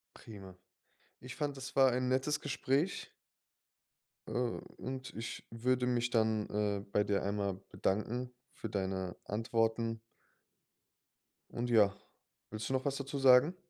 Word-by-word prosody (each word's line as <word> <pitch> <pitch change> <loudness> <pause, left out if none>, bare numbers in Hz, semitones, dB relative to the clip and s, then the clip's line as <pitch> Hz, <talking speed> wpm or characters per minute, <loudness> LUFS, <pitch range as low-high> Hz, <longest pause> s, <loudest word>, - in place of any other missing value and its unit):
Prima. 95 -4 -11 0.6
Ich 125 0 -8
fande, 145 -2 -1
das 135 0 -7
war 135 -2 +6
ein 125 +1 0
nettes 130 +4 +1
Gespräch. 145 +4 0 1.2
Äh, - - -6
und 130 +1 -4
ich 115 +1 -5
würde 125 +2 +1
mich 120 -1 +1
dann, 110 -2 +2
äh, 105 -1 0
bei 105 - +3
dir 100 -1 0
einmal 100 -1 -1 0.2
bedanken 120 +5 -1 0.2
für 115 - -6
deine 95 -2 -2
Antworten. 115 +1 0 1.5
Und 120 +1 -3
ja, 105 -4 +5 0.6
willst 110 +1 -4
du - - 0
noch 130 +1 0
was 140 -1 0
dazu 140 +1 -4
sagen? 135 +6 +7
120 Hz, 130 wpm, -34 LUFS, 105-130 Hz, 1.5 s, sagen